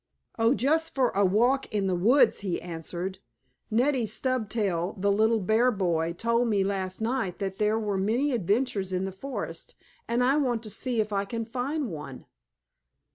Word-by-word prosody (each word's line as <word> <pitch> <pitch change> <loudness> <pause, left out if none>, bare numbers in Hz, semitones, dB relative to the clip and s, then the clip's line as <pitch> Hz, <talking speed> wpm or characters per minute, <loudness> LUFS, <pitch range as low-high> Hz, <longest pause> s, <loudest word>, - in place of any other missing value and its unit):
"Oh, 230 +4 +4
just 320 +6 +1
for 260 -3 +3
a 200 - +2
walk 240 +8 +2
in 205 -2 0
the 190 - +1
woods," 225 +11 +4
he 190 -4 -2
answered. 175 +2 -5 0.5
"Neddie 245 +1 +2
Stubtail, 215 -6 -1
the 200 +1 +2
little 220 +2 +3
bear 220 +6 +3
boy, 170 -6 0
told 230 +5 +1
me 205 -3 +2
last 190 0 -3
night 225 -6 -1
that 195 0 -4
there 210 +1 +2
were 205 -3 -1
many 235 +9 +1
adventures 205 -2 0
in 185 +1 -1
the 195 - -4
forest, 270 +9 -6 0.3
and 240 +1 +1
I 270 +4 +3
want 245 -6 0
to 215 - -7
see 240 +2 -1
if 215 -1 0
I 200 0 0
can 230 +2 -4
find 255 - -3
one." 145 -5 -8
215 Hz, 175 wpm, -27 LUFS, 190-245 Hz, 0.5 s, Oh